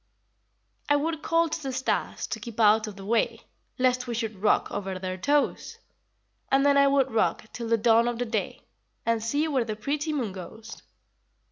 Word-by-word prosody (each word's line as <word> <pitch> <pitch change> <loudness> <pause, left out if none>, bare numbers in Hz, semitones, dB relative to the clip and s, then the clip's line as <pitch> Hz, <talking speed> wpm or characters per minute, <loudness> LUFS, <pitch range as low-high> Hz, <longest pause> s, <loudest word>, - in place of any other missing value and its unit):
I 290 - +5
would 310 +2 -1
call 330 +1 +2
to 320 - -4
the 270 -2 -3
stars 260 +1 -2
To - - -5
keep 235 -2 -9
out 215 0 +5
of 210 - -7
the 195 -1 -10
way 230 +2 0 0.4
Lest 255 -1 +1
we 240 - -3
should 220 -4 -4
rock 210 - +2
over 195 -2 -4
their 185 0 -4
toes; 285 +10 0 0.7
And 275 +1 +4
then 285 0 +5
I 280 0 +6
would 275 -1 +2
rock 225 - +1
Till 235 -1 -5
the 230 0 +3
dawn 230 +1 +4
of 240 -1 -1
the 245 - -1
day, 220 -3 -3 0.4
And 230 -1 +1
see 285 +8 0
where 270 -5 +1
the 220 -2 -4
pretty 290 +8 -2
moon 255 -9 -2
goes. 220 +4 -10
235 Hz, 195 wpm, -27 LUFS, 215-280 Hz, 0.7 s, I